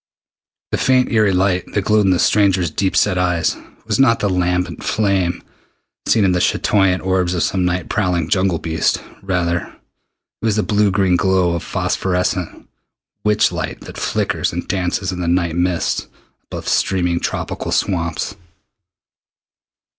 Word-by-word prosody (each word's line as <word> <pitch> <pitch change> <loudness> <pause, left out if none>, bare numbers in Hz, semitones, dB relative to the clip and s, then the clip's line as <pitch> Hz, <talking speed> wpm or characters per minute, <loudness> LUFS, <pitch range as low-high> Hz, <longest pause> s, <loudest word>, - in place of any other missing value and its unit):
The - - -1
faint 130 -1 +3
eery 110 -3 +3
light 90 -1 +1
that 100 - +1
glowed 105 +1 +3
in - - +3
the 90 - +3
stranger's 95 -4 +2
deep 95 +3 -1
set 90 - +2
eyes 90 -2 +1 0.3
was - - -1
not 115 -4 +5
the 100 - 0
lambent 90 0 -1
flame 95 -5 0 0.6
seen 110 -3 +3
in 95 - +3
the 90 - +1
chatoyant 95 -3 +2
orbs 90 -1 +1
of 85 - 0
some 90 +4 0
night 90 0 -1
prowling 90 -6 0
jungle 95 0 +1
beast. 80 0 0 0.2
Rather 85 -3 -2 0.7
was 110 -1 0
it - - +3
the - - -3
blue 105 0 +4
green 95 -2 +2
glow 95 -2 +2
of 85 - -2
phosphorescent 90 -1 -2 0.6
witch 105 -2 +3
light 80 -4 -4
that - - -10
flickers - - -1
and - - -5
dances 95 0 -1
in 90 -1 -5
the 85 - -2
night 85 -1 +1
mists 90 0 0 0.4
above - - -7
steaming 90 -3 +1
tropical - - -3
swamps. 85 -1 -1
90 Hz, 155 wpm, -18 LUFS, 90-100 Hz, 0.7 s, not